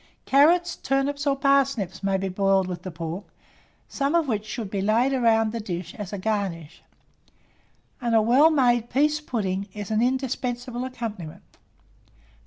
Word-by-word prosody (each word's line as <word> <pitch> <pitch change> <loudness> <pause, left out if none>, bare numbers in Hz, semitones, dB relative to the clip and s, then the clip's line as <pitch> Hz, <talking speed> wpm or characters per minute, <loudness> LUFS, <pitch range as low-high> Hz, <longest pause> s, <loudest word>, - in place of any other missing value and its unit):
Carrots, 335 +5 +4
turnips, 280 +2 -1
or 275 - +3
parsnips 275 -7 +1
may 195 -1 +1
be 195 0 -2
boiled 195 0 +2
with 180 -1 -5
the 185 - -6
pork, 170 +2 -5 0.6
some 280 +3 -1
of 330 -3 +2
which 215 -3 -2
should 215 -4 -5
be 200 - -2
laid 230 +7 +2
round 225 -3 +3
the 230 - -4
dish 175 -4 -5
as 205 -3 -7
a 205 - -4
garnish, 190 -6 -3 1.2
and 235 -1 +1
a - - +6
well 260 +8 +5
made 240 -6 +2
pease 300 +3 +1
pudding 200 -8 -2
is 205 -1 -6
an 215 +1 +2
indispensable 250 -1 -2
accompaniment. 220 -10 -7
230 Hz, 155 wpm, -25 LUFS, 195-270 Hz, 1.2 s, a